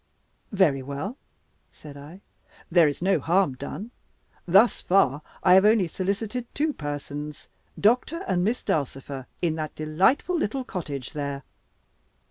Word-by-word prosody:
"Very 180 -10 +3
well," 140 - -5 0.6
said 145 -2 -12
I, 150 +7 -12 0.5
"there 170 -2 +6
is 145 +3 -3
no 195 +1 +3
harm 175 -3 +2
done. 205 - -7 0.6
Thus 195 +7 +5
far, 150 -7 +3 0.2
I 180 - +6
have 190 +1 +7
only 210 -2 +4
solicited 205 +7 -3
two 305 +1 0
persons, 145 - -6 0.3
Doctor 250 - +2
and 175 -1 +1
Miss 225 +6 0
Dulcifer, 135 -2 -3 0.2
in 165 -2 +2
that 155 -1 -4
delightful 185 - +1
little 270 -4 -1
cottage 150 - -6
there." 140 -2 -4
175 Hz, 130 wpm, -25 LUFS, 145-205 Hz, 0.6 s, have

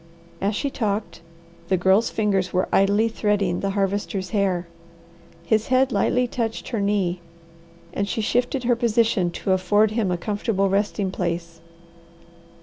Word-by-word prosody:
As 200 +2 0
she 280 +5 -2
talked 200 -8 -3 0.5
the 190 - +2
Girl's 190 +5 +3
fingers 195 -4 0
were 185 0 +1
idly 205 +3 +3
threading 205 -5 0
the 195 - -1
Harvester's 195 -1 -1
hair. 190 -5 0 0.8
His 220 +4 +1
head 260 +1 +3
lightly 250 +1 +2
touched 230 -2 -3
her 225 -4 -2
knee, 195 -3 0 0.7
and 200 0 -2
she - - -2
shifted 245 +4 0
her 240 0 +3
position 230 -5 +2
to 190 - -3
afford 205 +3 +3
him 215 -3 0
a 180 - 0
comfortable 205 +1 -1
resting 200 0 0
place. 170 -2 -4
200 Hz, 145 wpm, -23 LUFS, 185-225 Hz, 0.8 s, Girl's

